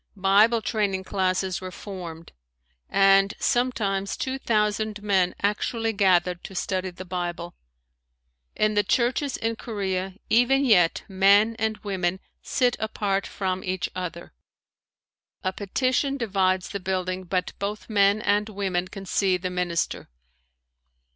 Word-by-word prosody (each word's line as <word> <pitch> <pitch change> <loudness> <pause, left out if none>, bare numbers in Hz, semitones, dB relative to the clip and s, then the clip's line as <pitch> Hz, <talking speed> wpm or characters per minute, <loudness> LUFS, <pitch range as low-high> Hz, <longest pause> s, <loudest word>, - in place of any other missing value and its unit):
Bible 210 +4 +4
training 200 -4 -1
classes 185 -1 -1
were 185 - -5
formed 175 -4 -8 0.6
and 195 0 +4
sometimes 205 -6 0
two 265 0 -3
thousand 210 -2 0
men 190 -3 +2
actually 225 +2 0
gathered 180 -3 +2
to 190 - -9
study 185 0 -2
the 185 +1 -10
Bible. 175 -1 -4 1.0
In 215 0 +2
the 205 - +4
churches 245 +6 0
in 225 0 -2
Korea, 190 -4 -3
even 255 +4 +3
yet 180 -9 +4
men 200 +3 +4
and 220 -1 0
women 190 -2 -1 0.2
sit 245 -1 +1
apart 205 -2 -1
from 190 -1 -3
each 185 -1 -2
other. 175 -2 -6 1.1
A 185 -1 -1
petition 255 +8 0
divides 190 -5 0
the 200 - -4
building 185 0 -2
but 180 +1 -2
both 205 +1 -4
men 205 -1 +3
and 210 +1 +1
women 190 -3 -2
can 195 +1 -9
see 190 -1 +1
the 185 0 -4
minister. 180 -2 -2
195 Hz, 130 wpm, -25 LUFS, 185-215 Hz, 1.1 s, Bible